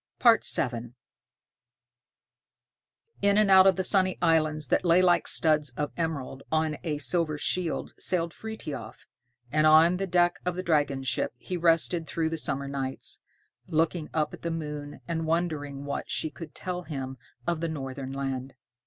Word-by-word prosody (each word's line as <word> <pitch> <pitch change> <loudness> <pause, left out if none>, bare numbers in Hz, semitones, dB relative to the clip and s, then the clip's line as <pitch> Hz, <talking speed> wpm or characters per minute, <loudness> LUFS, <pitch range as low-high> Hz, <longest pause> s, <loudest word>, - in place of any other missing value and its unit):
VII 125 - +2 2.3
In 200 0 +4
and 210 -2 +4
out 190 0 +8
of 190 - +5
the 190 - -1
sunny 185 -1 +2
islands 155 -4 +2
that - - +2
lay 175 0 +5
like 180 -1 +3
studs 155 -2 +2
of 150 -1 -2
emerald 145 -5 -3
on 155 -1 +1
a 155 -3 -1
silver 155 0 +1
shield 170 +2 -2
sailed 170 -2 0
Frithiof, 220 -9 -7 0.5
and 155 +1 +4
on 160 +3 +6
the 195 +1 -2
deck 175 -1 +2
of 180 -1 -1
the 185 - -3
dragon 145 -5 +1
ship 130 - -1
he 180 +9 -5
rested 165 -1 +2
through 160 +2 -1
the 165 - -2
summer 140 -2 -1
nights, 135 -1 -3 0.5
looking 160 0 0
up 155 -2 -1
at - - -9
the 170 - -2
moon, 150 -3 -5
and 165 -1 -2
wondering 150 -4 -2
what 140 - -4
she 155 - -2
could 160 -3 -10
tell 180 -1 -4
him 135 -6 -6 0.3
of 170 -2 0
the 165 - -1
northern 135 -3 -5
land. 135 -1 -4
160 Hz, 160 wpm, -28 LUFS, 145-175 Hz, 2.3 s, out